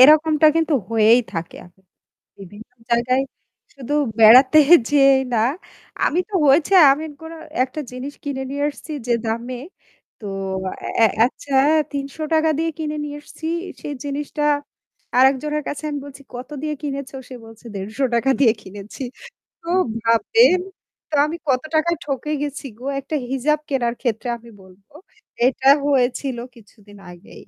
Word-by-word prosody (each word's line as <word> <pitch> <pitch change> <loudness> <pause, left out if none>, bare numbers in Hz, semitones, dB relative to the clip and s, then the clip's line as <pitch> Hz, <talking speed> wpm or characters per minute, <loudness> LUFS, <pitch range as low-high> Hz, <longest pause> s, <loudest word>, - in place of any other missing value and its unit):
এরকমটা 305 +2 +6
কিন্তু 325 -1 +1 0.2
হয়েই 225 +2 +5
থাকে 165 -1 -5
আ - - -14 0.7
বিভিন্ন 205 +4 -12 0.2
জায়গায় 245 +3 +2 0.5
শুধু 275 +1 -7 0.3
বেড়াতে 260 +7 +8 0.3
যেয়েই 275 -2 +5
না, - - +2 0.7
আমি 350 - +1
তো 410 - -11
হয়েছে, 300 +7 +4 0.2
আমি 305 +3 -3 0.2
পরে 320 +1 -9 0.3
একটা 285 +4 -7
জিনিস 260 +3 -6
কিনে 270 -2 -3
নিয়ে 285 +1 -2
আসছি 310 +2 -11
যে 240 - +1
দামে 235 +3 -3 0.6
তো 210 - -8 0.8
এ - - +8
এ - - +7 0.2
আচ্ছা 275 +1 -7 0.4
৳৩০০ 310 +3 -1
দিয়ে 330 0 0
কিনে 305 -1 -3
নিয়ে 290 0 -6
এসেছি। 315 +2 -10 0.4
সেই 290 - -5
জিনিসটা 290 +1 -4 0.8
আরেকজনের 275 +3 +2
কাছে 290 - -5
আমি 290 - -3
বলছি 280 0 -12
কত 250 +1 -7
দিয়ে 305 -1 -2
কিনেছ? 280 -2 -4 0.2
সে 260 - -9
বলছে 225 +1 -16
"৳১৫০ 235 +5 -1
দিয়ে 235 -6 +5
কিনেছি।" 200 +6 -10 0.6
তো 335 - -12 0.3
ভাববেন 365 - +4 0.5
তো 310 - -4
আমি 320 +3 -4
কত 255 -1 +2
টাকায় 340 +2 +2
ঠকে 290 +1 -4
গেছি 285 -1 -5
গো? 250 - -12 0.2
একটা 300 +3 -4
হিজাব 290 +3 +1
কেনার 240 -4 0
ক্ষেত্রে 240 0 -2
আমি 235 0 -16
বলবো। 190 +7 -21 0.5
এটা 260 +1 +1 0.2
হয়েছিল 260 -1 0 0.2
কিছুদিন 205 -2 -18
আগেই। 175 +2 -14
270 Hz, 140 wpm, -21 LUFS, 235-300 Hz, 0.8 s, বেড়াতে